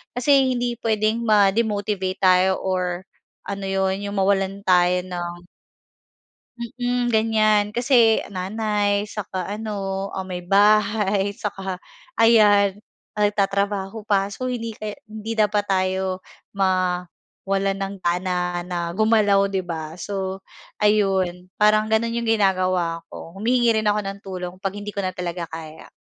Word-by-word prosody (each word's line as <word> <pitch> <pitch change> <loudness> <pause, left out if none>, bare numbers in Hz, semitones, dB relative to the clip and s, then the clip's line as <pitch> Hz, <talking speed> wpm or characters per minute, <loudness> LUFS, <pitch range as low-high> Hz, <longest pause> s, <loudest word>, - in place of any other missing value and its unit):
kasi 260 0 +3
hindi 245 0 -1
puwedeng 220 0 +1
ma-demotivate 205 -2 +1
tayo 185 +1 +4
or 185 -1 -1 0.4
ano 200 -1 -4
'yon, 190 0 0
'yong 200 - -4
mawalan 195 0 +1
tayo 180 0 +3
ng 175 -1 -5 1.2
Mm, 245 +1 -2
ganiyan. 215 -1 +3
Kasi 240 -3 +4
nanay 205 +1 -1
'saka 190 -3 -4 0.2
ano, 195 -3 -3
ah, 190 - -3
may 185 -1 -5
bahay 205 +1 +2
'saka, 195 -4 -5 0.3
ayan, 205 -3 +5 0.4
nagtatrabaho 200 0 0
pa. 200 -1 +1
So, 255 +5 -5
hindi 240 -2 -3
kaya 215 -1 -5 0.2
hindi 220 +1 -5
dapat 210 -1 +1
tayo 190 -1 -1 0.3
mawalan 190 +1 -1
ng 195 0 -4
gana 180 0 -1
na 175 -1 -4
gumalaw, 205 -2 +3
'di 190 -2 -2
ba? 160 0 -6
So, 190 -1 -4 0.4
ayun, 190 -4 +1
parang 215 +1 +3
gano'n 230 +1 +1
'yong 235 -1 -1
ginagawa 185 -4 +1
ko. 165 - -10
Humihingi 235 +3 +2
rin 210 - +2
ako 205 - +1
ng 195 0 -5
tulong 180 -2 -6
'pag 195 +1 -3
hindi 205 0 -7
ko 200 - -2
na 185 - -1
talaga 175 -2 -5
kaya. 160 -1 -9
195 Hz, 130 wpm, -22 LUFS, 185-215 Hz, 1.2 s, ayan